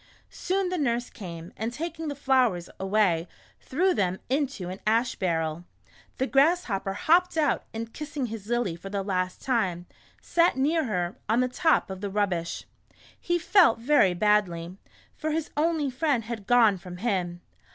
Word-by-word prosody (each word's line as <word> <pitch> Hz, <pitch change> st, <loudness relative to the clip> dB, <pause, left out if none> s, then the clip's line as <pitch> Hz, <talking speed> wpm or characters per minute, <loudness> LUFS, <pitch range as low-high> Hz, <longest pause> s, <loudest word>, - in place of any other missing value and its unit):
Soon 380 Hz, 0 st, -1 dB
the 365 Hz, -1 st, -2 dB
nurse 245 Hz, -3 st, -1 dB
came, 170 Hz, -3 st, -9 dB
and 225 Hz, +2 st, -3 dB
taking 325 Hz, +4 st, -5 dB
the 290 Hz, -, -3 dB
flowers, 255 Hz, -10 st, +1 dB
away, 190 Hz, -4 st, +1 dB, 0.3 s
threw 360 Hz, +7 st, +1 dB
them 185 Hz, -, 0 dB
into 270 Hz, -9 st, -1 dB
an 185 Hz, +2 st, -6 dB
ash 230 Hz, +2 st, +2 dB
barrel. 165 Hz, -2 st, -1 dB, 0.5 s
The 260 Hz, -, +1 dB
Grass 310 Hz, +7 st, +3 dB
hopper 195 Hz, -2 st, -3 dB
hopped 340 Hz, -, +2 dB
out, 295 Hz, -5 st, +1 dB
and 225 Hz, 0 st, -6 dB
kissing 295 Hz, -3 st, -4 dB
his 220 Hz, -3 st, -7 dB
Lily 240 Hz, -7 st, 0 dB
for 185 Hz, +3 st, -9 dB
the 200 Hz, 0 st, -2 dB
last 185 Hz, -2 st, -2 dB
time, 185 Hz, -9 st, 0 dB, 0.3 s
sat 335 Hz, -4 st, +2 dB
near 310 Hz, +4 st, +2 dB
her, 180 Hz, -5 st, -2 dB
on 230 Hz, +3 st, +3 dB
the 255 Hz, -, +2 dB
top 255 Hz, -3 st, +1 dB
of 190 Hz, 0 st, -7 dB
the 205 Hz, -, -3 dB
rubbish. 190 Hz, -4 st, -1 dB, 0.6 s
He 345 Hz, 0 st, 0 dB
felt 345 Hz, -, +5 dB
very 230 Hz, -7 st, +3 dB
badly, 180 Hz, -4 st, +1 dB, 0.4 s
for 310 Hz, -, -4 dB
his 315 Hz, 0 st, -2 dB
only 305 Hz, -2 st, +1 dB
friend 265 Hz, -2 st, 0 dB
had 220 Hz, -3 st, -6 dB
gone 225 Hz, -6 st, +5 dB
from 180 Hz, 0 st, -9 dB
him. 180 Hz, -5 st, -2 dB
230 Hz, 165 wpm, -27 LUFS, 185-290 Hz, 0.6 s, felt